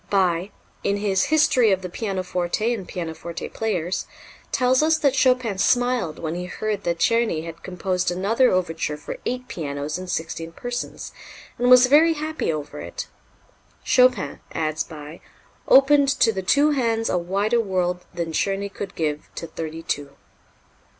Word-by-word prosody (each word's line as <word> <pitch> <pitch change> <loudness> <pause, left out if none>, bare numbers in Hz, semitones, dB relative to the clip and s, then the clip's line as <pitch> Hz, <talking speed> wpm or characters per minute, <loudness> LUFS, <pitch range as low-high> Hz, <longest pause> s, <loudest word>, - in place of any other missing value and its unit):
Bie, 185 -2 +1 0.3
in 200 0 +1
his 195 -2 +1
"History 285 -7 +4
of 190 -1 0
the - - -3
Pianoforte 185 +2 -1
and 195 -6 -6
Pianoforte 170 -1 -5
Players," 185 -5 -2 0.4
tells 255 +1 +3
us 320 +1 +3
that 285 -4 +2
Chopin 255 -6 +2
smiled 245 -8 +1
when 160 -1 -4
he 180 +1 -4
heard 205 +2 -3
that 170 -1 0
Czerny 225 -6 +1
had 165 0 -9
composed 180 -1 -2
another 210 +8 +2
overture 165 -4 -1
for 150 - -7
eight 250 +1 -3
pianos 145 0 -4
and 185 0 -7
sixteen 165 0 -4
persons, 245 +4 -5 0.5
and 245 +1 +2
was 250 0 +9
very 305 +5 +5
happy 310 - -2
over 150 -2 -5
it. - - -6 0.7
"Chopin," 250 - +3
adds 155 -1 -1
Bie, 155 0 -10 0.5
"opened 280 +1 +6
to 225 - +4
the 190 - -3
two 285 +11 +3
hands 230 -5 0
a 180 - +1
wider 200 +7 0
world 180 -3 -1
than 170 -2 -4
Czerny 195 +4 -1
could 195 -1 -6
give 150 -2 -2
to - - -5
thirty 160 0 -6
two." 140 -2 -3
190 Hz, 155 wpm, -23 LUFS, 165-245 Hz, 0.7 s, was